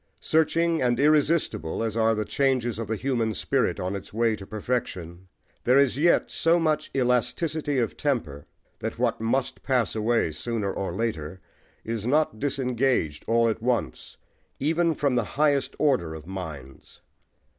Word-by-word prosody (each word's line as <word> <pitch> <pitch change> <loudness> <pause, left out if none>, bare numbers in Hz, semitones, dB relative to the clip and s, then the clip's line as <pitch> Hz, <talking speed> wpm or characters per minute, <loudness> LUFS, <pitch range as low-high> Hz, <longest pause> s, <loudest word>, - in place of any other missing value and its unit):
Searching 165 +1 +2
and 120 -1 +1
irresistible 150 - +2
as 110 -1 -2
are 115 0 +3
the 105 0 -2
changes 125 -4 0
of 115 - -4
the 110 - -1
human 115 -3 -1
spirit - - 0
on 90 +2 -2
its 100 - -8
way 115 0 +1
to 95 -2 -11
perfection, 95 -6 -4 0.4
there 125 +2 +4
is 140 -3 +4
yet 170 +3 +3
so 165 +1 +3
much 155 -2 0
elasticity 140 +4 0
of 120 -3 0
temper 100 - -2 0.3
that - - -4
what - - 0
must 125 +4 -1
pass 125 -5 0
away 110 -5 +1
sooner 100 +5 -3
or 95 - -3
later 95 -5 -3 0.5
is 115 -1 -3
not 145 -5 +1
disengaged 125 - 0
all 115 0 +3
at 110 0 -1
once, 115 - -2 0.4
even 165 +3 +1
from 140 -2 +1
the 120 -1 +2
highest 145 -2 +2
order 125 - +1
of 80 -1 -10
minds. 80 -8 -8
120 Hz, 155 wpm, -26 LUFS, 100-140 Hz, 0.5 s, there